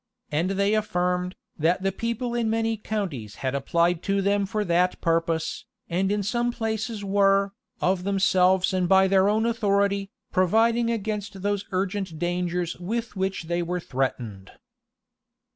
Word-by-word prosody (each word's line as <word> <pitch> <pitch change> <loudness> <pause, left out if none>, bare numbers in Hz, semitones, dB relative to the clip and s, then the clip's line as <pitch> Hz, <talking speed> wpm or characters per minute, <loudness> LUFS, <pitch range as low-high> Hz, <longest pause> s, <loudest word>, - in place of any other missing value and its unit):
And 160 +5 +1
they 200 +1 +2
affirmed, 180 -3 0 0.2
that 170 +5 +2
the 195 - +2
people 235 +4 -3
in 235 -2 0
many 225 0 +1
counties 185 - -4
had 130 - 0
applied 170 +5 +1
to 200 +1 0
them 200 0 +1
for 210 +1 -1
that 180 +1 +2
purpose, 165 -1 0 0.3
and 190 +3 +1
in 205 0 0
some 240 +4 0
places 220 -2 -3
were, 195 0 +3 0.3
of 185 0 +1
themselves 190 -1 +3
and 180 -2 +1
by 190 0 +6
their 190 +1 +4
own 220 +2 +2
authority, 200 -3 +1 0.2
providing 225 +5 +3
against 210 -3 -3
those 205 0 0
urgent 190 -2 -2
dangers 175 0 -1
with 225 +5 -3
which 190 -2 -2
they 170 +1 -1
were 175 +1 -2
threatened. 125 - -3
195 Hz, 145 wpm, -25 LUFS, 175-210 Hz, 0.3 s, by